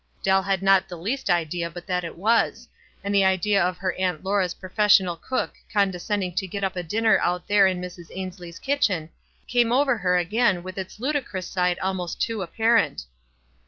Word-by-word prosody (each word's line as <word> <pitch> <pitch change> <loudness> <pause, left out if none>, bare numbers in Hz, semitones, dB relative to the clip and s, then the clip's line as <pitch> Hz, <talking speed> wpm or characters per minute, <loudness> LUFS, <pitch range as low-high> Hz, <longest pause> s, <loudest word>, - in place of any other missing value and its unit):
Dell 190 0 +3
had 190 0 -1
not 195 0 +4
the 175 - -7
least 230 +11 -3
idea 170 0 0
but 175 +1 -10
that 180 -1 -1
it 165 - -7
was; 225 +6 +1 0.4
and 200 0 -2
the 200 -1 +4
idea 190 +1 +2
of 180 0 -1
her 185 -1 -2
Aunt 185 -4 -2
Laura's 190 -2 0
professional 190 -2 +3
cook 255 +9 -3 0.2
condescending 195 -2 0
to 190 - 0
get 200 +2 -5
up 190 -1 -1
a 180 - -2
dinner 220 +6 +2
out 180 0 -1
there 205 -1 +5
in 185 -1 -1
Mrs. 180 -1 -8
Ainslie's 180 -2 -7
kitchen 200 - 0 0.4
came 240 -1 +2
over 260 -2 +2
her 180 -1 +2
again 185 +1 +1
with 185 +1 -7
its 190 +2 -7
ludicrous 255 - -2
side 180 -1 0
almost 185 -2 -3
too 225 -2 -1
appar 225 +5 +3
ent. - - -7
190 Hz, 190 wpm, -24 LUFS, 180-210 Hz, 0.4 s, there